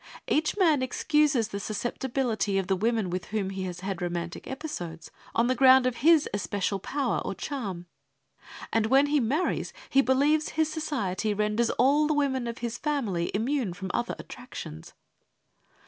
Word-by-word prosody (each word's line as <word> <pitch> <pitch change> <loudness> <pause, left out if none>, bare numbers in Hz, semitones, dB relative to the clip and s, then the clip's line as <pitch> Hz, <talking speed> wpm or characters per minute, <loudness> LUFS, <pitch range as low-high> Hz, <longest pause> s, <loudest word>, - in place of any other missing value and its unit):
Each 310 +5 +1
man 320 -8 +4
excuses 285 -2 +2
the 200 - -4
susceptibility 230 0 -1
of 195 - 0
the 190 +1 +1
women 220 -1 0
with 180 0 -3
whom 205 -3 -2
he 190 -1 -4
has 180 -1 -6
had 190 -2 -4
romantic 175 -1 -4
episodes, 265 - -6 0.2
on 230 - +3
the 255 - +2
ground 260 0 +6
of 255 -2 0
his 315 +2 +5
especial 200 0 -1
power 280 +8 -1
or - - -4
charm. 200 - -5 0.9
And 225 -1 +2
when 270 +4 +5
he 290 0 +2
marries, 275 +9 0 0.2
he 275 - +6
believes 285 +4 +2
his 315 0 0
society 220 - -2
renders 210 +3 +1
all 285 +4 +3
the 305 - +1
women 265 -4 0
of 235 - -4
his 230 -1 -4
family 230 - -1
immune 235 -2 0
from 190 -2 -5
other 240 0 -1
attractions. 165 - -9
235 Hz, 165 wpm, -27 LUFS, 195-285 Hz, 0.9 s, ground